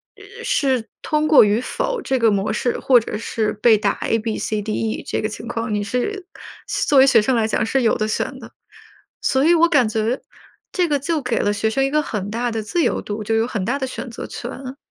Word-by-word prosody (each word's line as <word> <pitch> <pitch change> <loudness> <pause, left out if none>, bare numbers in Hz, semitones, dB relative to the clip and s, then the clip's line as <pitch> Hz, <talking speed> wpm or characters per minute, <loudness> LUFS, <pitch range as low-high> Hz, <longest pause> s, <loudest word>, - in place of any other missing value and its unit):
呃 - - -12
是 260 -5 0
通 305 0 0
过 305 -2 +8
与 210 +3 +1
否 - - -2
这 265 -7 -1
个 230 -1 +4
模 200 -1 0
式 245 - -1
或 255 -2 +5
者 215 -2 -5
是 215 -1 -2
被 215 +1 +4
打 205 -1 +1
A、 225 - +1
B、 220 0 -3
C、 215 -1 -2
D、 215 +1 -4
E 220 0 -2
这 - - -1
个 215 - -1
情 225 - -8
况。 230 -2 -3
你 205 - 0
是 350 - -3 0.6
作 285 - +6
为 265 - +7
学 235 -5 +6
生 255 +4 +1
来 220 - +2
讲 220 0 0
是 270 +4 +1
有 225 - +2
得 215 - 0
选 215 - -2
的。 - - -12 0.7
所 265 +1 +2
以 335 +3 +5
我 335 +1 +5
感 285 -9 +3
觉 220 +3 -1 0.5
这 360 -2 +1
个 290 -2 +1
就 315 +2 -1
给 250 -3 -1
了 205 - +1
学 205 +2 0
生 270 +5 0
一 270 - +1
个 305 +1 +2
很 205 -8 -4
大 240 +2 -1
的 225 -1 -3
自 340 +11 -1
由 - - 0
度， 210 +1 -5
就 225 - 0
有 225 0 +2
很 215 -6 -3
大 245 +6 0
的 270 - -2
选 255 - -6
择 230 - -7
权。 260 +2 -7
235 Hz, 260 characters per minute, -21 LUFS, 215-270 Hz, 0.7 s, 过